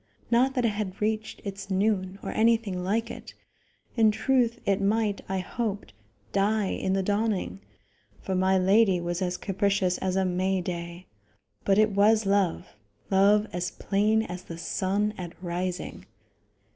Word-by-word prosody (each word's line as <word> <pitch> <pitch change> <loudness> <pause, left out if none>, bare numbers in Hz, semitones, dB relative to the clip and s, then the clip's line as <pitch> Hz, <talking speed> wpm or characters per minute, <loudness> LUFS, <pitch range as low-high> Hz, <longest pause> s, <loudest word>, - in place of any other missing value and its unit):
Not 255 +3 +3
that 250 -2 +1
it - - +4
had 205 -3 -4
reached 215 +1 -2
its 195 -1 -6
noon, 195 -1 0
or - - -3
anything 220 -5 +1
like 225 +5 -1
it. - - -10 0.6
In 225 -2 +5
truth, 235 +2 +1
it 200 0 +1
might, 210 0 +1
I 190 - -1
hoped, 205 - -4 0.4
die 200 0 +1
in 190 - -1
the 195 0 +1
dawning, 205 - -1 0.6
for 190 - -4
my 190 +1 +3
lady 190 0 +4
was 175 +1 -3
as 180 -1 -1
capricious 195 -2 0
as 185 -1 -1
a 190 0 +2
May 185 +1 0
day; 170 0 -5 0.6
but 195 - +3
it 215 0 +4
was 210 +2 +4
love 195 - 0 0.4
love 200 +2 +5
as 180 0 -2
plain 215 +2 +1
as 180 -3 -6
the 165 -2 -9
sun 200 +4 -1
at 175 -2 -6
rising. 180 0 -4
195 Hz, 155 wpm, -27 LUFS, 185-215 Hz, 0.6 s, In